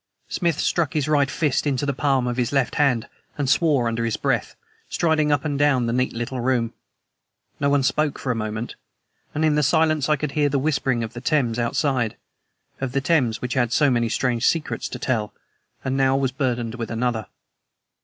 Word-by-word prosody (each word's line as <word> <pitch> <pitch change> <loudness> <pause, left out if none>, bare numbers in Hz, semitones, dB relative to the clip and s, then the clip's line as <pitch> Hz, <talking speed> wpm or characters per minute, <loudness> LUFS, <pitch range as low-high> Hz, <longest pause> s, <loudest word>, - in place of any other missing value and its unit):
Smith 170 -4 0
struck 170 -4 +1
his 150 -2 +1
right 145 -3 +3
fist 150 -1 0
into 140 0 0
the 140 - 0
palm 135 -2 +1
of 120 0 -2
his 125 -1 0
left 135 -3 +1
hand 135 -7 +2 0.3
and 145 -2 -1
swore 145 -3 +3
under 115 0 -1
his 115 -2 -1
breath, - - -1 0.3
striding 155 -3 +1
up 145 - +1
and 145 -2 -1
down 140 -4 +3
the 115 - -1
neat 125 +1 +1
little 120 +2 -4
room. 120 -2 0 0.9
No 140 - +2
one 140 -1 +3
spoke 150 +2 +1
for 130 - -2
a - - -1
moment, 110 +1 -4 0.6
and 155 +2 +1
in 155 - +3
the 150 - +2
silence 155 0 +2
I 150 - +5
could 150 0 -3
hear 145 -1 +2
the 140 - 0
whispering 135 -4 0
of 110 +1 -6
the 120 - -7
Thames 125 -4 +1
outside 120 -1 0 0.6
of 130 -2 -3
the 140 - +1
Thames 125 -10 +2
which 125 -1 -2
had 120 -3 +1
so 145 +2 +3
many 120 -2 +1
strange 120 0 +1
secrets 165 -2 -1
to - - -5
tell, 110 -5 -2 0.5
and 130 0 0
now 135 0 +3
was 135 -2 0
burdened 125 -4 -2
with 115 -2 -5
another. 115 -2 -1
130 Hz, 205 wpm, -23 LUFS, 120-145 Hz, 0.9 s, I